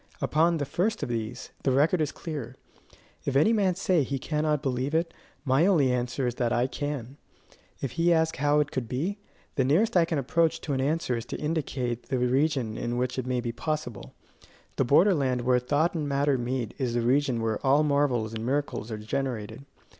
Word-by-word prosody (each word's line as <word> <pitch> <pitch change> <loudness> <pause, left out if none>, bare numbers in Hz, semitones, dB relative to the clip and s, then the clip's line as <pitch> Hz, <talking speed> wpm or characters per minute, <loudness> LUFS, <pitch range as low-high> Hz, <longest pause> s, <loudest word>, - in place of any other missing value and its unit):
Upon 165 +2 +2
the 145 - -2
first 210 +10 -1
of - - -3
these, 115 +1 -4
the - - +1
record 155 +6 +3
is 150 - 0
clear. 140 -7 -6 0.7
If 135 - -2
any 155 +12 +5
man 195 -5 +2
say 185 -3 +2
he 140 0 -2
cannot 150 +1 -1
believe 130 +3 -1
it, 165 0 0 0.3
my 135 +6 +3
only 150 -10 +4
answer 125 +1 -1
is 120 - 0
that 120 -1 +1
I 120 0 +2
can. 140 -1 -4 0.6
If 135 - -2
he 170 +1 +2
ask 160 -1 +2
how 145 +1 +3
it 145 - -3
could 125 -4 -3
be, 175 +11 -2 0.4
the 135 - +3
nearest 175 - +2
I 175 -2 +5
can 165 -2 -2
approach 160 +4 +1
to 145 - -3
an 130 - 0
answer 140 -3 0
is 115 - -5
to - - -4
indicate 140 -6 -2
the 130 - 0
region 125 -2 +1
in 120 +1 -2
which 125 +1 -1
it 130 - -4
may 125 -1 0
be 120 -1 -3
possible: 130 -3 -4 0.6
the - - +2
border 165 +10 +5
land 130 -6 0
where 125 0 +3
thought 145 +7 +1
and 150 -4 -2
matter 140 0 +2
meet 125 -2 -2
is 125 -3 -1
the 120 - +2
region 130 0 +2
where 110 -1 -2
all 140 +3 +4
marvels 140 -7 +1
and 110 0 -4
miracles 130 -3 -2
are 110 - -4
generated. 110 +1 -4
135 Hz, 205 wpm, -27 LUFS, 125-155 Hz, 0.7 s, any